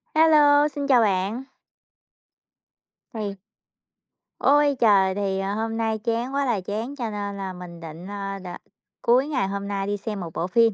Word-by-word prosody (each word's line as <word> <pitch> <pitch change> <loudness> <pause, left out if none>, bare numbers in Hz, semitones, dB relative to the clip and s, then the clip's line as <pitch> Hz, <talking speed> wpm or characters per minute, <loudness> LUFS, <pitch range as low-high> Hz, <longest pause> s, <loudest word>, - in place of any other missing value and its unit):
Hello, 300 -2 +6
xin 285 -1 -4
chào 255 -4 +5
bạn. 205 +4 0 1.7
Thì 210 -3 -4 1.0
Ôi 290 0 +4
trời, 195 -4 +4
thì, 195 -1 -1
ờ, 195 +1 -2
hôm 225 +1 -2
nay 225 -1 0
chán 235 +3 -2
quá 280 0 +1
là 230 -7 0
chán 220 +8 -4
cho 240 -5 -3
nên 205 -1 -4
là 190 -1 -4
mình 180 -1 -10
định, 165 +2 -9
ờ, 195 -1 -5
đ - - -8 0.5
cuối 255 +4 +3
ngày 270 -10 0
hôm 200 0 -4
nay 200 -1 -2
đi 205 0 -1
xem 205 0 -5
một 165 -3 -6
bộ 175 - -2
phim, 230 +3 +4
210 Hz, 175 wpm, -24 LUFS, 195-250 Hz, 1.7 s, Hello